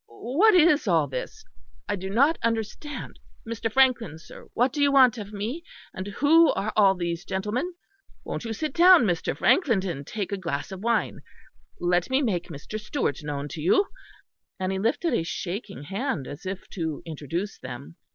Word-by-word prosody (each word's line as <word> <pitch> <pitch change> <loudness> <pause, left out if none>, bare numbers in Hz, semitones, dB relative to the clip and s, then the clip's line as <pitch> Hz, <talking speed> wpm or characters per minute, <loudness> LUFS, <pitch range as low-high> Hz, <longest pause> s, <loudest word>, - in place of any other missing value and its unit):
What 290 - +2
is 310 -7 +5
all 165 -5 +3
this? 130 -2 -6 0.4
I - - 0
do 190 0 -6
not 280 +11 +3
understand. 230 +6 -3 0.3
Mr. 225 0 -3
Frankland, 235 - +2
sir, - - -13
what 245 +2 +2
do 295 - -2
you 285 0 +4
want 255 -4 +5
of 205 -1 -7
me? 220 +11 -4 0.3
And 185 +1 -6
who 305 +10 +5
are 205 +3 -2
all 195 -2 +5
these 170 -1 -3
gentlemen? 210 - -3 0.5
Won't - - -5
you 225 - -4
sit 285 +5 -3
down, 355 -2 +7
Mr. 175 -6 -1
Frankland 230 - +3
and 145 -7 -5
take 205 -3 -4
a 200 - -1
glass 165 -2 -4
of 190 - -6
wine. 235 0 0 0.6
Let 175 0 +1
me 265 +2 +2
make 180 -8 -1
Mr. 160 +8 -7
Stewart 210 - -2
known 145 -1 -4
to 160 - -7
you." 390 - +3 0.7
And 185 0 -1
he 190 - -2
lifted 285 - 0
a - - +2
shaking 190 +2 -5
hand 195 - -3
as 145 +7 -8
if 190 0 -5
to 160 -5 -4
introduce 165 +5 -5
them. 130 +5 -9
205 Hz, 180 wpm, -26 LUFS, 175-260 Hz, 0.7 s, down